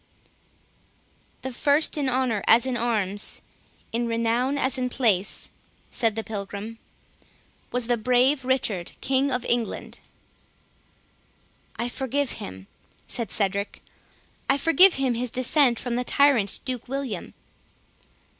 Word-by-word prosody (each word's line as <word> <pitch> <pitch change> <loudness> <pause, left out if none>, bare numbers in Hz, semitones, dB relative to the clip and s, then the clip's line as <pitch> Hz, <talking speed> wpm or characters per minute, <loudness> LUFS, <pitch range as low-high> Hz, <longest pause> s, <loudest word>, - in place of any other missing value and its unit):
"The 260 - -4
first 285 +5 +2
in 285 -3 0
honour 250 -5 0
as 230 +2 +6
in 260 -1 -1
arms, 215 -4 0 0.5
in 235 +1 -1
renown 230 +4 0
as 260 -2 0
in 250 0 -1
place," 215 -7 0 0.4
said 225 -3 +1
the 225 - -3
Pilgrim, 210 +1 -6 0.9
"was 250 -1 0
the 240 0 +1
brave 255 +4 +3
Richard, 235 -9 0
King 270 +1 +1
of 250 -1 -1
England." 240 -1 -2 1.8
"I 235 - -2
forgive 265 +2 -2
him," 95 +1 -8 0.4
said 235 -4 -2
Cedric; 200 0 -2 0.7
"I 275 - +4
forgive 340 +5 +6
him 270 -2 +1
his 240 +1 -2
descent 255 0 +3
from 245 -1 -2
the 250 - 0
tyrant 250 -7 +3
Duke 255 -3 -4
William." 260 -8 -4
245 Hz, 120 wpm, -25 LUFS, 225-265 Hz, 1.8 s, as